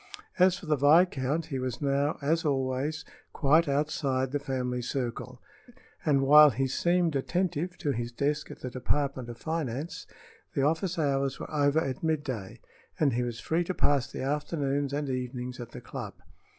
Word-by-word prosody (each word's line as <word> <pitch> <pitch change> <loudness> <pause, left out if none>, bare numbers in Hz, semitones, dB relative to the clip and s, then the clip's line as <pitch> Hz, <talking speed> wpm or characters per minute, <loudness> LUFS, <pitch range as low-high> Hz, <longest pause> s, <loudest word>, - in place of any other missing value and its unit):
As 185 0 +5
for - - -11
the 155 -1 +2
viscount, 150 0 +3
he 140 -5 -4
was 130 -2 -3
now, 140 +1 +1
as 165 +4 +1
always, 140 +2 -1 0.3
quite 155 +3 +4
outside 140 -2 0
the 145 - 0
family 125 -3 -2
circle, 125 0 -4 0.6
and 140 -3 +3
while 150 +2 +9
he 135 +1 -1
seemed 170 +3 +1
attentive 175 +4 -1
to 145 - -1
his 120 -1 -3
desk 145 +4 -1
at - - -10
the 125 - -5
Department 130 -1 -1
of 120 - -7
Finance, 155 -1 -4 0.5
the 135 - +2
office 165 +5 0
hours 140 -3 0
were - - -7
over 145 0 +2
at 135 -5 -3
midday 140 -11 -2 0.4
and 145 -5 +3
he 120 - 0
was 120 -2 -3
free 165 +9 0
to 185 +1 -4
pass 140 -4 +1
the - - -5
afternoons 145 -1 -1
and 145 0 -2
evenings 125 -1 -4
at 120 - -7
the - - -9
club. - - -7
140 Hz, 170 wpm, -29 LUFS, 130-155 Hz, 0.6 s, while